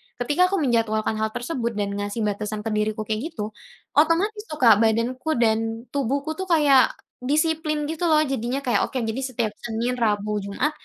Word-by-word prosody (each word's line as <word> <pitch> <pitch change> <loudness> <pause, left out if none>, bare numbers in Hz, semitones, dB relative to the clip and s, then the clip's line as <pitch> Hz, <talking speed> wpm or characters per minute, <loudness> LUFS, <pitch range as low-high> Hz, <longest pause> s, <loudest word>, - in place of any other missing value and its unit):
ketika 290 +9 +2
aku 390 - -1
menjadwalkan 220 -3 +1
hal 220 - +1
tersebut, 240 -4 -3
dan 205 -1 -1
ngasih 205 +2 -3
batasan 210 +1 -2
ke 225 - -3
diriku 215 0 -1
kayak 220 +7 -2
gitu, 210 +1 -4 0.4
otomatis 360 +8 +2
tuh 305 - -6
Kak, 225 -6 +6
badanku 235 +7 +1
dan 225 0 +1
tubuhku 280 +3 -1
tuh 380 - -3
kayak 290 -7 +4 0.2
disiplin 305 +2 0
gitu 325 +2 -2
loh. 310 -2 +4
Jadinya 265 -2 -1
kayak, 250 -3 +1
"Oke, 255 -3 -3
jadi 225 +2 -2
setiap 235 -4 -1
Senin, 240 +2 -2
Rabu, 210 -2 0
Jumat, 200 +9 0
240 Hz, 170 wpm, -24 LUFS, 220-295 Hz, 0.4 s, Kak